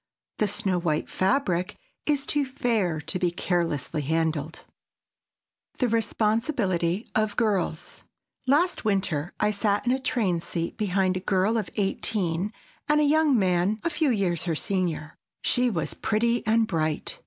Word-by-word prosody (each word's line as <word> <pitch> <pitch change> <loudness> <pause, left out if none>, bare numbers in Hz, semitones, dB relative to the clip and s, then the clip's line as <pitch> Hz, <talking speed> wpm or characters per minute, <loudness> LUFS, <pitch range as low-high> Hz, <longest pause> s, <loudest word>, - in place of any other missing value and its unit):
The 215 - +3
snow 190 -2 0
white 155 -3 -1
fabric 185 -3 +1 0.3
is 285 -2 +1
too 295 -1 +1
fair 230 - 0
to 185 - -3
be 180 - +2
carelessly 170 -4 -1
handled. 160 0 -1
[Sidenote: - - -21
THE 250 - +2
RESPONSIBILITY 215 - 0
OF 215 -1 +1
GIRLS] 200 -8 -1 0.4
Last 320 +7 +2
winter 190 -7 0
I 210 - +2
sat 205 +1 0
in 245 - +2
a 260 - +1
train 215 -10 0
seat 170 0 -3
behind 190 -2 +1
a - - -2
girl 190 +4 +1
of 210 -6 -1
eighteen 195 -2 -1 0.4
and 300 0 +4
a - - +4
young 300 -2 +4
man 185 +2 +2
a 335 - 0
few 305 -1 +1
years 185 -8 0
her 165 -2 0
senior. 165 -4 -2 0.2
She 250 0 +2
was 170 -8 -2
pretty 235 +2 +1
and 225 +1 +4
bright. 155 -7 -2
195 Hz, 150 wpm, -26 LUFS, 175-230 Hz, 0.4 s, and